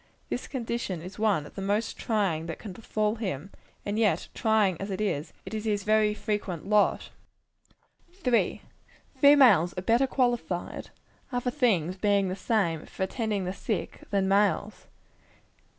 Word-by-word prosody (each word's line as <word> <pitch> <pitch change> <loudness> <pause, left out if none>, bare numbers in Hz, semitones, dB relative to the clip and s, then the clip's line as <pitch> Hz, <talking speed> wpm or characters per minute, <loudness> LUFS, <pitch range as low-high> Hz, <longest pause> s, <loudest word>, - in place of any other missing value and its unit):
This 245 - -3
condition 235 - -3
is 185 +4 -9
one 205 -9 +2
of - - -12
the 195 - -6
most 205 +3 -1
trying 190 -8 -1
that 165 - -5
can 205 -4 -8
befall 215 +2 -1
him; 190 - -4 0.3
and 205 +2 -1
yet, 215 -3 +1
trying 210 -6 +2
as 195 - -4
it 195 - -3
is, 170 -7 -1
it - - -8
is 215 0 -3
his 205 -2 0
very 215 0 +3
frequent 205 -5 -3
lot. 210 0 +2 1.0
3. 250 -11 +1 0.5
Females 250 - +6
are 180 - -3
better 235 +6 +3
qualified 240 -10 -1 0.4
other 245 0 -1
things 195 - +1
being 200 -1 +2
the 185 - -2
same 195 -7 0
for - - -4
attending 210 -1 -2
the 180 - -2
sick, 195 -2 -4
than 195 -2 +1
males. 200 +1 +1
205 Hz, 150 wpm, -28 LUFS, 185-225 Hz, 1.0 s, Females